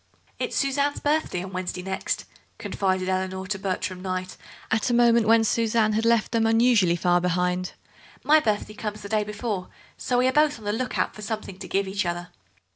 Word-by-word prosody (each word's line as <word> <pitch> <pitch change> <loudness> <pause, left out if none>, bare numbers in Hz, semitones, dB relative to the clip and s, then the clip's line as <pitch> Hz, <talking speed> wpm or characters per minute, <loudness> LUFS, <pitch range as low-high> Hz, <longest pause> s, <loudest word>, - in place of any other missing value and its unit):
"It's - - -2
Suzanne's 280 +1 +1
birthday 295 - 0
on 190 0 -8
Wednesday 180 0 -4
next," 190 0 -3 0.3
confided 185 -1 -1
Eleanor 190 0 -2
to 195 +1 -3
Bertram 185 -1 -3
Kneyght 185 0 -4 0.4
at 225 +2 +1
a 240 - +2
moment 235 -2 +4
when 225 0 +5
Suzanne 225 -1 +2
had 220 +2 0
left 230 -1 +3
them 225 -1 +2
unusually 225 -6 +4
far 175 0 +2
behind; 180 +1 0 0.5
"my 310 +1 +6
birthday 215 -4 -1
comes 210 -1 -5
the 200 - -7
day 215 0 +1
before, 210 -2 -4 0.3
so 250 - -1
we 250 +1 +3
are 260 - +1
both 300 -1 +3
on 220 - -13
the 205 - 0
look 250 +3 -2
out - - 0
for 215 - -11
something 210 -3 -5
to - - -7
give 195 0 0
each 195 +2 -1
other." 175 +1 -4
210 Hz, 200 wpm, -25 LUFS, 185-230 Hz, 0.5 s, my